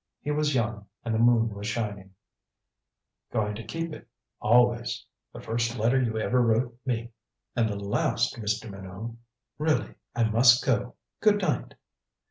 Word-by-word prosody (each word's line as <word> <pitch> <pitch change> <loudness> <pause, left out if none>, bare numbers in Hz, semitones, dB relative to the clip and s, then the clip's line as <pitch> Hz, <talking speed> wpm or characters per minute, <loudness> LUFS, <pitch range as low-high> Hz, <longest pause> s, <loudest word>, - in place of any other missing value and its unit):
He 150 - -1
was 150 -1 +1
young, 110 -4 -1 0.2
and 115 - -1
the 110 - +1
moon 115 -1 +4
was 100 +1 -6
shining 105 -4 -4 0.6
" - - -58
going 105 -1 0
to 110 +3 -7
keep 165 +9 -4
it - - -11 0.3
always. 120 +1 +3 0.3
The - - -9
first 115 +2 -1
letter 120 +4 +3
you 115 -3 0
ever 125 +3 +2
wrote 120 +1 +2
me 120 -1 -1 0.2
" - - -56
"And 115 -3 +2
the 105 - -2
last, 110 +4 0
Mr. 110 +1 -2
Minot. 95 +4 -7 0.4
Really 155 0 +1 0.2
I 120 - +2
must 120 +3 +5
go. 125 -1 0 0.2
Good 210 -1 +4
night." 155 -10 -1
115 Hz, 160 wpm, -27 LUFS, 110-125 Hz, 0.6 s, must